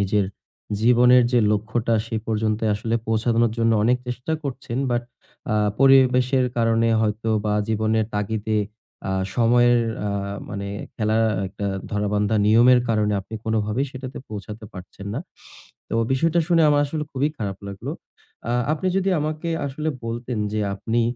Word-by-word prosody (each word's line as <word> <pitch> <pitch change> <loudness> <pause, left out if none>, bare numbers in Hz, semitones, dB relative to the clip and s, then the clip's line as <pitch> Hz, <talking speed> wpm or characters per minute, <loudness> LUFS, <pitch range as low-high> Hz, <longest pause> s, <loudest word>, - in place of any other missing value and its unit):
নিজের 100 +1 +2 0.6
জীবনের 125 +2 +6
যে 125 - +5
লক্ষ্যটা 110 +2 0
সে 115 - -3
পর্যন্তই 110 0 0
আসলে 110 +2 -2
পৌঁছানোর 115 +1 +2
জন্য 115 0 +3
অনেক 125 +2 +4
চেষ্টা 125 +5 -4
করছেন। 130 -3 -4
বাট 120 0 +1 0.5
আ - - +1 0.2
পরিবেশের 130 -1 +5
কারণে 115 0 +2
হয়তো 110 +1 -1 0.2
বা 105 -1 +1
জীবনের 110 0 +1
তাগিদে 105 +1 -1 0.5
আ - - -1 0.2
সময়ের 120 +1 +4 0.3
আ - - -1 0.4
মানে 100 0 -4 0.3
খেলা 110 0 +1 0.3
একটা 100 +1 -5 0.2
ধরাবান্ধা 105 +1 0
নিয়মের 120 +3 +6
কারণে 105 -2 +1
আপনি 110 +3 -10
কোনভাবেই 110 +4 0
সেটাতে 130 0 -7
পৌঁছাতে 105 +1 -7
পারছেন 95 +2 -10
না। 130 - -2 0.7
তো - - -4 0.2
বিষয়টা 165 +5 +2
শুনে 170 -2 +4
আমার 145 -1 +4
আসলে 150 +1 -3
খুবই 140 +2 +1
খারাপ 100 -3 -4
লাগলো। 100 -1 -6 0.6
আ - - +1 0.2
আপনি 160 +4 -2
যদি 195 0 +1
আমাকে 155 +2 -3 0.2
আসলে 150 +3 -3 0.2
বলতেন, 115 +1 -4
যে 110 - -1 0.2
আপনি 115 +4 0
115 Hz, 145 wpm, -23 LUFS, 110-125 Hz, 0.7 s, জীবনের